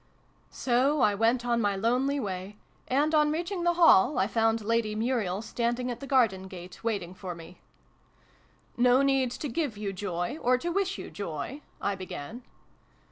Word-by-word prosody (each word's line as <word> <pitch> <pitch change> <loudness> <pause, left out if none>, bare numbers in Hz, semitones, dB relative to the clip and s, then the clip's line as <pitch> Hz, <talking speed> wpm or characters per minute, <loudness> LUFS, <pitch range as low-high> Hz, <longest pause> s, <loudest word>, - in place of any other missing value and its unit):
So 265 +4 +1
I 210 - +4
went 230 +4 +1
on 235 -1 +1
my 205 -2 +1
lonely 250 +7 +1
way, 195 -2 -5 0.3
and, 290 +4 +1
on 300 -1 +4
reach 340 +4 -2
ing 365 -3 -2
the 345 0 +2
Hall, 300 - +6
I 190 - +3
found 225 +1 +1
Lady 225 -1 0
Muriel 220 -4 -1
standing 240 +2 -1
at 240 - -6
the 275 - -8
garden 225 -8 +2
gate 185 +1 -11
waiting 200 -6 -2
for 185 -2 -7
me. 170 +2 -13 0.6
" - - -34
No 255 +2 +5
need 270 -2 +2
to 255 +5 -5
give 265 -3 -2
you 205 -2 -3
joy, 185 - -3
or 250 +1 +3
to 340 +7 -3
wish 390 +2 -1
you - - -8
joy? 200 - -5
" - - -35
I 200 - -1
began. 185 - -7
235 Hz, 185 wpm, -28 LUFS, 195-270 Hz, 0.6 s, Hall